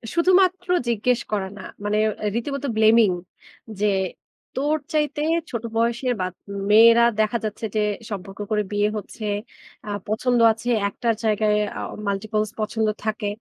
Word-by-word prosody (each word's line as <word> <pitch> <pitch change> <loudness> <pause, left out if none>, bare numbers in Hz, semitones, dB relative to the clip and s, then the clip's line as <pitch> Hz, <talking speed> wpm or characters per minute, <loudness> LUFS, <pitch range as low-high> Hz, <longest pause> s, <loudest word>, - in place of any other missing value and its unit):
শুধুমাত্র 365 +1 +3 0.2
জিজ্ঞেস 235 +2 +1
করা 200 -2 -1
না। 190 - -8 0.2
মানে 210 +1 0 0.3
এ - - +2
রীতিমত 275 +4 -3
blaming, 220 -2 +5 0.7
যে, 210 - +1 0.7
"তোর 290 +3 +1 0.2
চাইতে 295 -1 0 0.3
ছোট 235 -2 -4
বয়সের 235 +2 +1
বাত 185 -1 -2 0.4
মেয়েরা 230 +2 +7 0.2
দেখা 215 +2 +2
যাচ্ছে, 215 +1 -4
যে 215 - +2 0.3
সম্পর্ক 195 0 -6
করে 210 0 +2
বিয়ে 205 0 +2
হচ্ছে। 215 +2 -7 0.6
আ - - -4 0.2
পছন্দ 240 +3 +1
আছে। 225 +2 -4 0.2
একটার 230 +2 0
জায়গায় 215 -1 +2 0.2
অ - - -4 0.3
multiples 210 +1 -1
পছন্দ 220 0 0 0.2
থাকে। 215 -1 -2
220 Hz, 140 wpm, -23 LUFS, 210-245 Hz, 0.7 s, মেয়েরা